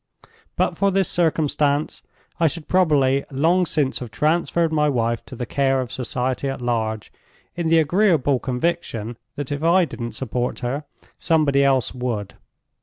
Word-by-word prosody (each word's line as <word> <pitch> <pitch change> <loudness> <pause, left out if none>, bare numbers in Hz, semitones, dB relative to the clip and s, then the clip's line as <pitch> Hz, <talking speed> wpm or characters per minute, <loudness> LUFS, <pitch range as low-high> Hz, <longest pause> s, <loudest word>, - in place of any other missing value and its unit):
But - - 0
for 200 - +3
this 195 -1 +1
circumstance, 150 -3 0 0.4
I 165 - +4
should 160 0 -5
probably 140 -7 +3
long 165 +6 +2
since 140 -4 0
have 125 - -7
transferred 165 +5 +1
my 150 -1 +3
wife 115 -3 0
to 130 - -10
the 120 - -4
care 135 +1 +1
of 125 -2 -4
society 130 +1 -2
at 135 - -4
large—in 120 +7 -4
the 165 - +5
agreeable 160 -5 +3
conviction 125 -5 -2 0.2
that 145 -1 -5
if 145 0 -2
I 175 +2 +4
didn't 120 -6 -6
support 125 -1 -3
her, 135 +4 -3 0.3
somebody 150 -5 +3
else 135 -2 +2
would. 120 -5 -3
140 Hz, 150 wpm, -22 LUFS, 125-165 Hz, 0.4 s, the